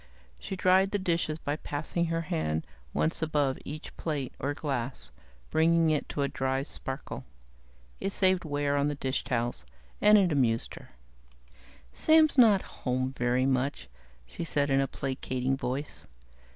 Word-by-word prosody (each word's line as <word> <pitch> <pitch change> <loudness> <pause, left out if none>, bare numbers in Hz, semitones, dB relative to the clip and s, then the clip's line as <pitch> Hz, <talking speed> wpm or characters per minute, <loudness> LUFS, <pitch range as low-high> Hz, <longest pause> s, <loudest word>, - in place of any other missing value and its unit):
She 195 - -5
dried 185 +1 +4
the 205 - 0
dishes 170 -4 -1
by 145 -1 -3
passing 155 +3 -2
her 165 0 -1
hand 80 - -2 0.3
once 160 - 0
above 145 -4 +1
each 150 +2 -8
plate 145 -6 -3
or 145 +1 -1
glass, 125 - -4 0.4
bringing 165 0 +4
it 150 - -1
to 145 - -1
a - - +1
dry 135 0 -1
sparkle. 135 -1 -6 0.8
It 195 - -2
saved 185 -2 +2
wear 145 -2 0
on 140 0 +2
the 145 - -1
dishtowels, 120 - -2 0.4
and 210 0 +7
it 190 -4 +3
amused 120 -6 +1
her. - - -12 1.0
"Sam's 315 -1 +4
not 220 -7 +6 0.2
home 130 +1 -1
very 125 +1 +1
much," 130 - 0 0.4
she 60 - -6
said 145 -3 0
in 135 0 +4
a 135 - 0
placating 130 -1 -2
voice. 135 +2 -4
145 Hz, 150 wpm, -29 LUFS, 130-165 Hz, 1.0 s, and